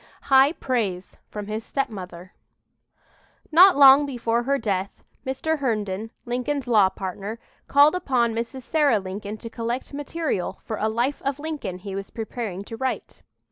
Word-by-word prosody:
HIGH 270 +3 +7
PRAISE 210 - -2
FROM 210 -1 -6
HIS 215 +2 -4
STEPMOTHER 190 -10 -5 1.2
Not 360 +1 +7
long 280 +1 +8
before 235 -3 0
her 275 +3 +1
death, 195 -6 -3 0.2
Mr. 305 +4 -1
Herndon, 215 -5 -2 0.2
Lincoln's 250 +3 -2
law 210 -5 +5
partner, 195 +3 -6 0.3
called 285 +2 +6
upon 255 -10 +1
Mrs. 235 +3 -4
Sarah 295 -5 +3
Lincoln 200 +2 -6
to 230 - -9
collect 235 +4 -4
material 290 - -3
for 220 - -4
a 220 - 0
"Life 240 +6 -1
of 275 0 -2
Lincoln" 290 - -5
he 195 +1 -8
was 195 0 -5
preparing 220 -4 -5
to 225 - -8
write. 260 +3 -4
235 Hz, 145 wpm, -24 LUFS, 205-275 Hz, 1.2 s, long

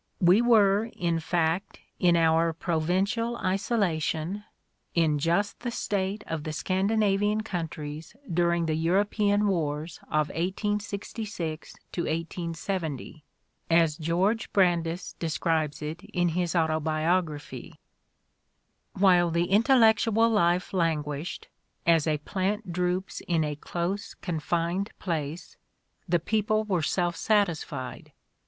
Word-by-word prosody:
j| - - +1
We 185 +6 +6
were, 215 -3 +4
in 170 -2 0
fact, 165 +2 -1 0.2
in 175 -2 +4
our 165 0 +3
provincial 190 +9 0
isolation, 190 -3 -1 0.5
in 160 -3 +3
just 175 +7 0
the 240 - -3
state 205 -2 -2
of 160 -2 -4
the 155 - -4
Scandinavian 200 +5 +1
countries 160 -4 -5 0.2
during 170 0 +2
the 160 - 0
European 205 +5 +2
wars 155 -3 -2
of 155 -1 +1
1866 200 -2 -3 0.2
1870, 165 -2 -3 0.5
as 165 -2 +4
George 185 +8 0
Brandes 175 -2 +1
describes 160 -2 -1
it 155 +3 -5
in 175 -1 0
his 175 +1 -1
auto 160 -2 +2
biography: 155 0 -1 1.2
"While 180 -3 +4
the 170 +2 0
intellectual 225 0 +4
life 180 -4 +2
languished, 155 -3 -2 0.4
as 165 -2 +4
a 155 -1 +2
plant 190 +5 -2
droops 180 +2 -1
in 165 -2 +2
a 150 -1 -2
close, 175 +6 -4
confined 170 +3 -2
place, 160 -2 -4 0.5
the 175 - +4
people 215 +4 +1
were 190 -5 0
self 175 +2 0
satisfied. 165 - -1
175 Hz, 110 wpm, -27 LUFS, 160-200 Hz, 1.2 s, We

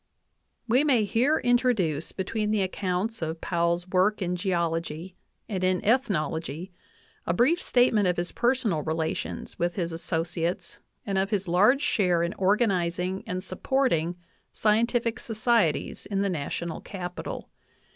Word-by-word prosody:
We 250 +5 +4
may 260 -7 +3
here 245 +9 +2
introduce 230 - +1
between 210 +3 -2
the 210 -2 +2
accounts 190 +3 -2
of 160 0 -3
Powell's 170 +1 0
work 190 +3 +2
in 180 -2 -1
Geology 170 -1 -2 0.3
and 190 -4 -3
in 185 0 +2
Ethnology 170 - 0 0.6
a 170 - +1
brief 310 - +3
statement 235 -5 +3
of 180 - +1
his 175 0 -2
personal 235 -10 +1
relations 160 +1 -3
with 175 0 0
his 170 -2 -2
associates 170 +1 -2 0.3
and 195 -2 0
of 195 +1 0
his 200 -3 -1
large 210 +11 +4
share 180 -11 +2
in 170 - -1
organizing 190 -2 +1
and 185 -2 -3
supporting 185 - 0 0.4
scientific 230 +2 +1
societies 225 -6 0
in 195 -1 -1
the 200 - +1
National 170 0 -3
Capital. 180 -3 -6
185 Hz, 135 wpm, -27 LUFS, 170-220 Hz, 0.6 s, We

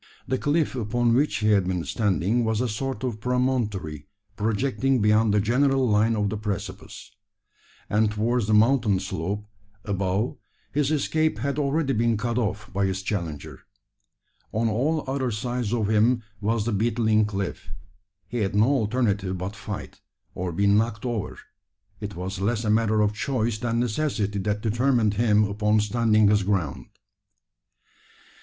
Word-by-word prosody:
The 130 - 0
cliff 150 +1 +1
upon 120 0 +1
which 140 +5 +2
he 105 -1 +1
had 100 -3 +3
been 90 -2 -2
standing, 105 +2 +1
was 110 -1 0
a 125 - +1
sort 130 +5 -4
of 120 -4 -3
promontory 110 - -1 0.3
projecting 125 +4 0
beyond 105 +1 +3
the 105 - +3
general 130 +4 +2
line 110 +1 +3
of 105 -2 0
the 110 - -2
precipice; 105 -3 -6 0.8
and 105 +1 +2
towards 110 +1 0
the 110 - +3
mountain 110 -3 +3
slope 95 +2 -4 0.4
above 100 +3 -1 0.3
his 145 -1 +1
escape 155 -2 +1
had 140 +5 -1
been 150 - +1
already 135 -6 +1
cut 120 +2 -1
off 105 -1 -3
by 100 0 +1
his 95 0 -3
challenger. 85 -8 -4 0.9
On 115 +2 0
all 140 +9 0
other 135 -1 -1
sides 120 0 -2
of 115 -4 0
him 115 +3 +3 0.2
was 110 +1 0
the 120 - 0
beetling 110 0 +2
cliff. 95 -7 -4 0.6
He 120 - -3
had 100 -1 -1
no 110 +5 +4
alternative 105 -7 0
but 95 +4 -5
fight, 105 0 -7 0.3
or 90 0 -3
be 100 +5 0
"knocked 105 +2 +2
over." 120 -4 -3 0.6
It 105 -3 -6
was 95 +2 -5
less 110 +3 0
a 105 - +1
matter 110 -1 +2
of 105 0 +2
choice 115 -2 -1
than 115 0 -1
necessity 110 -4 -1
that 105 +1 -1
determined 115 -1 +2
him 105 -1 +3
upon 105 +1 +1
standing 110 0 +3
his 105 0 +4
ground. 95 -8 -1
110 Hz, 155 wpm, -25 LUFS, 105-120 Hz, 0.9 s, no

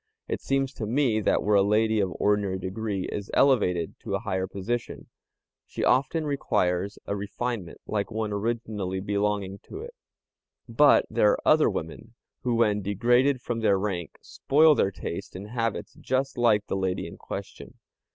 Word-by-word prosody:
It - - -3
seems 135 0 0
to 110 - -5
me 120 -2 +2
that 105 - +1
where 105 - +1
a 100 - +6
lady 110 +2 +2
of 95 -2 0
ordinary 100 -2 +1
degree 95 +1 -3
is 100 -1 -5
elevated 90 - +2
to - - -3
a - - -1
higher 95 0 -2
position, 115 +6 -4 0.6
she - - -5
often 145 +4 +2
acquires 95 -8 0
a 100 - -2
refinement 100 -2 -4
like 100 -2 -2
one 110 -2 -3
originally 105 -3 -2
belonging 100 0 -1
to 390 - -8
it; 480 +1 -9 0.7
but - - +5
there - - +3
are - - -4
other - - +5
women, - - -6 0.3
who 125 -2 0
when 105 -3 +2
degraded 120 +7 +2
from 120 -1 -2
their 105 -3 +3
rank 95 -4 -3
spoil 155 +3 +4
their 100 - +2
taste 95 0 -6
and 100 +3 -7
habits 115 -2 -2
just 130 +1 -2
like 110 -4 +3
the - - -3
lady 95 -1 -1
in - - -9
question. - - -8
105 Hz, 165 wpm, -26 LUFS, 100-120 Hz, 0.7 s, a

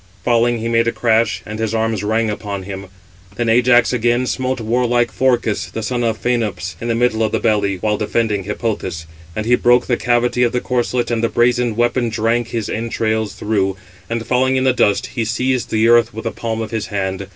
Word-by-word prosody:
Falling, 120 0 +2
he 115 +1 -3
made 115 0 +2
a - - +2
crash, 115 -1 +1
and 105 +1 -6
his 110 0 -1
arms 110 -2 -1
rang 110 +1 +1
upon 100 -2 -5
him. 95 0 -7 0.5
Then 120 -1 -1
Ajax 120 +1 +4
again 120 +1 +1
smote 130 +2 -2
warlike 120 +1 +1
Phorcys, 120 -5 0
the 110 - -4
son 120 +2 -1
of 110 -2 -1
Phænops, 110 -6 -1
in 115 - -3
the 115 - 0
middle 115 -2 +1
of 110 -1 +1
the - - 0
belly, 105 -3 +1
while 105 +3 -1
defending 105 -2 -1
Hippothous. 105 -6 -3 0.3
And 110 - -3
he 120 - +2
broke 120 0 +4
the 120 - 0
cavity 120 0 +1
of 120 -1 +2
the 125 - +1
corslet, 125 0 -1
and 115 -1 0
the 115 - +2
brazen 120 -1 +2
weapon 120 +1 +1
drank 115 +1 0
his 115 -2 -3
entrails 110 -2 -2
through; 100 -3 0 0.3
and 115 0 -3
falling 130 +1 +2
in 130 - +1
the 130 -1 +3
dust, 100 -4 +2
he 115 - -1
seized 125 +3 -1
the 110 +1 +2
earth 115 -2 +4
with 110 - -6
the - - -2
palm 115 -1 -4
of 110 - -7
his 110 -2 -3
hand. 95 -2 -3
115 Hz, 210 wpm, -18 LUFS, 110-120 Hz, 0.5 s, Ajax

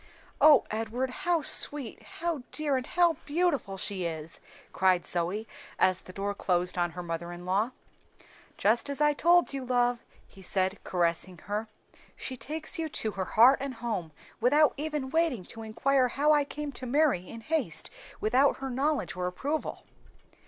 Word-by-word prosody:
"O 300 -4 +8
Edward, 225 +4 -2
how 350 +1 0
sweet, 285 -7 +1
how 335 -4 -4
dear, 300 -3 0
and 255 -1 -2
how 345 -3 +3
beautiful 290 - 0
she 190 0 -2
is!" 160 -1 -4 0.3
cried 185 -2 +2
Zoe, 180 +6 -1 0.3
as 185 -1 +2
the - - -12
door 200 +2 -3
closed 180 -2 0
on 175 -2 0
her 180 - -4
mother 170 0 -4
in 175 0 -9
law. 200 +6 +1 0.9
"Just 225 +6 +2
as 280 - -2
I 295 0 +4
told 345 +2 +4
you, 270 -1 -3
love," 245 -1 +1 0.3
he 195 - -16
said, 190 +1 -1
caressing 175 0 0
her. 210 +3 -3 0.5
"She 260 - -5
takes 310 +8 0
you 320 -1 -2
to 220 -7 -2
her 190 -2 -3
heart 245 +8 +6
and 275 -2 -4
home 220 -8 -3 0.3
without 290 +6 +4
even 295 -3 -3
waiting 320 - +1
to 225 - -9
inquire 255 +4 +1
how 285 +5 +2
I 295 -1 +3
came 295 0 -5
to 255 -1 -7
marry 260 - +2
in 230 - -8
haste 225 - -1 0.3
without 255 +6 +3
her 270 -1 -5
knowledge 280 +1 0
or 180 0 -2
approval." 285 +12 -3
245 Hz, 165 wpm, -29 LUFS, 190-290 Hz, 0.9 s, O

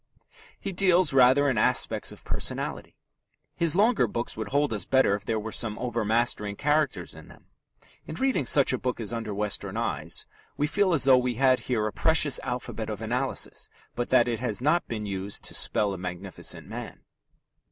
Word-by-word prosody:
He 195 - -4
deals 180 -4 +3
rather 135 +2 +5
in 125 -6 +1
aspects - - +2
of - - -14
personality. - - -3 0.6
His 170 -1 +1
longer 225 +5 +3
books 120 +1 -4
would 110 -1 -5
hold 145 +1 0
us 105 -4 -2
better 130 -3 +3
if 100 0 -4
there 110 -1 -1
were 110 +1 -6
some 110 -2 0
overmastering 115 -3 -1
characters 145 - 0
in - - -13
them. - - -17 0.6
In 155 - -6
reading 260 - 0
such 140 0 +5
a 130 - -1
book 125 -2 -3
as 115 0 -3
Under 115 -2 -4
Western 105 0 -2
Eyes - - -3 0.3
we 145 - +1
feel 185 +3 +1
as 140 - +2
though 130 -1 +6
we 125 -1 -2
had 130 +1 +3
here 110 -4 0
a 105 - -3
precious 160 -4 +3
alphabet 120 -3 -5
of 105 0 -5
analysis, 125 +4 -1 0.2
but 120 0 -3
that 120 - +4
it 115 -2 -2
has 120 -4 -2
not 150 +7 +1
been 110 -2 -4
used 100 0 -5
to - - -4
spell 100 -2 +3
a 95 - -7
magnificent 90 +1 -5
man. - - -8
120 Hz, 185 wpm, -26 LUFS, 105-145 Hz, 0.6 s, though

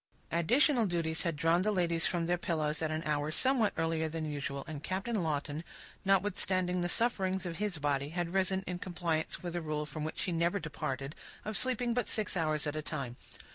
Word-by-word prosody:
Additional 235 - +4
duties 165 -2 0
had 170 -3 0
drawn 165 +4 +3
the 215 +3 +2
ladies 170 -4 +2
from 170 -2 0
their 175 +1 +2
pillows 155 -3 0
at 160 - +1
an 155 +1 -2
hour 150 -1 0
somewhat 245 +5 +3
earlier 160 -1 +1
than 160 0 -3
usual; 140 -2 -3
and 155 -3 -6
Captain 195 +3 -1
Lawton, 150 -1 -1 0.4
notwithstanding 185 -2 +2
the 175 - 0
sufferings 190 -4 +1
of 170 -2 -3
his 205 -4 -1
body, 145 -1 0
had 175 +1 -2
risen 190 0 +2
in 180 -1 -3
compliance 170 -2 -2
with 175 -1 -3
a 175 - 0
rule 155 -1 -2
from 150 +1 -5
which 155 - -2
he 180 - 0
never 170 +3 +2
departed, 140 -3 -3 0.3
of 215 - -3
sleeping 245 -1 +2
but 245 -2 0
six 215 -2 +1
hours 155 -3 +1
at 150 0 -2
a 155 - -1
time. 140 -6 -4
170 Hz, 200 wpm, -33 LUFS, 155-190 Hz, 0.4 s, Additional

